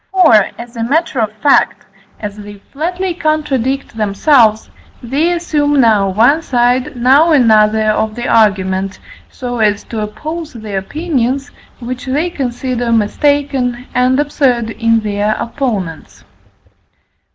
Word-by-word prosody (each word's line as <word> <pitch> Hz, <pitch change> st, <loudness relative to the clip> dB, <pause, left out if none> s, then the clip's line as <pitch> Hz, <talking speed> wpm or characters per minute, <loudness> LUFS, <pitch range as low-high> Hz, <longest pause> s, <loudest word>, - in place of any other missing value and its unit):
For, 365 Hz, -9 st, +4 dB, 0.2 s
as 240 Hz, +1 st, -10 dB
a 230 Hz, -, -3 dB
matter 285 Hz, +2 st, 0 dB
of 220 Hz, -2 st, 0 dB
fact, 285 Hz, -, +2 dB, 0.3 s
as 205 Hz, -1 st, -6 dB
they 205 Hz, -1 st, -10 dB, 0.2 s
flatly 355 Hz, +5 st, -2 dB
contradict 275 Hz, -6 st, -1 dB
themselves, 220 Hz, +2 st, +2 dB, 0.4 s
they 285 Hz, +8 st, 0 dB
assume 300 Hz, -4 st, 0 dB
now 215 Hz, -5 st, +3 dB
one 235 Hz, +11 st, +3 dB
side, 250 Hz, 0 st, 0 dB
now 270 Hz, +7 st, +4 dB
another, 220 Hz, -5 st, +4 dB
of 215 Hz, 0 st, -1 dB
the 240 Hz, -, -4 dB
argument, 195 Hz, -3 st, +1 dB, 0.3 s
so 245 Hz, -2 st, -5 dB
as 210 Hz, -1 st, +1 dB
to 225 Hz, -2 st, -5 dB
oppose 310 Hz, +10 st, -6 dB
the 215 Hz, -4 st, -7 dB
opinions, 275 Hz, -, -2 dB, 0.3 s
which 255 Hz, +1 st, -7 dB
they 300 Hz, +7 st, -1 dB
consider 245 Hz, -3 st, -3 dB
mistaken 250 Hz, +2 st, 0 dB
and 255 Hz, +2 st, +2 dB
absurd 255 Hz, -6 st, 0 dB
in 230 Hz, 0 st, +1 dB
their 210 Hz, 0 st, -1 dB
opponents. 215 Hz, -, -4 dB
245 Hz, 125 wpm, -14 LUFS, 215-290 Hz, 0.4 s, For